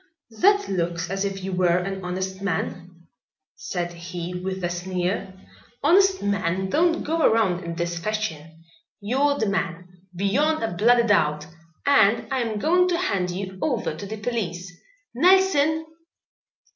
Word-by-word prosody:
"That 400 - +3
looks 170 -2 -2
as 195 0 -1
if 195 -1 -4
you 190 - -3
were 180 -1 +2
an 190 +1 -4
honest 190 +1 -4
man," 175 -2 -4 0.5
said 175 -1 -4
he 170 +1 -6
with 185 +1 -4
a 175 - 0
sneer. 180 +2 -2 0.5
"Honest 380 +5 +4
men 190 -2 -1
don't 335 +1 +2
go 325 +2 -1
around 205 - +2
in 170 0 -5
this 170 0 -2
fashion. 165 -6 -4 0.4
You're 275 +7 +1
the 220 - 0
man, 180 -3 -2 0.3
beyond 255 - +1
a 225 - -2
bloody 235 +6 +4
doubt, 150 -8 +2 0.4
and 230 -6 +4
I 265 - +1
am 225 -3 -2
going 355 - +3
to 355 -1 +1
hand 195 - -1
you 190 +1 -5
over 250 -7 -1
to 200 - -7
the 220 +2 -6
police. 185 -6 -4 0.4
Nelson!" 320 0 +3
195 Hz, 145 wpm, -24 LUFS, 180-245 Hz, 0.5 s, Honest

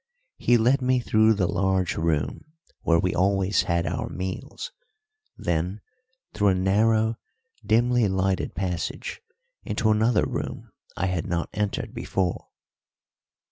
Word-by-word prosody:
He 120 - +4
led 125 +4 +3
me 130 0 +2
through 110 -2 +3
the 95 -3 +1
large 95 -1 +1
room 80 - -2 0.3
where 85 - +3
we 90 +2 +1
always 95 0 +2
had 85 0 0
our - - -2
meals, 95 - -5 0.7
then 85 +4 -1 0.5
through 105 - +2
a 95 - +4
narrow, 110 +4 +2 0.4
dimly 120 +1 +3
lighted 95 0 0
passage 90 -3 -3 0.4
into 110 - +1
another 110 +1 +3
room - - -5 0.3
I - - 0
had 90 -3 -1
not 85 -1 -1
entered 105 -1 -2
before. 90 -3 -2
95 Hz, 125 wpm, -25 LUFS, 90-110 Hz, 0.7 s, He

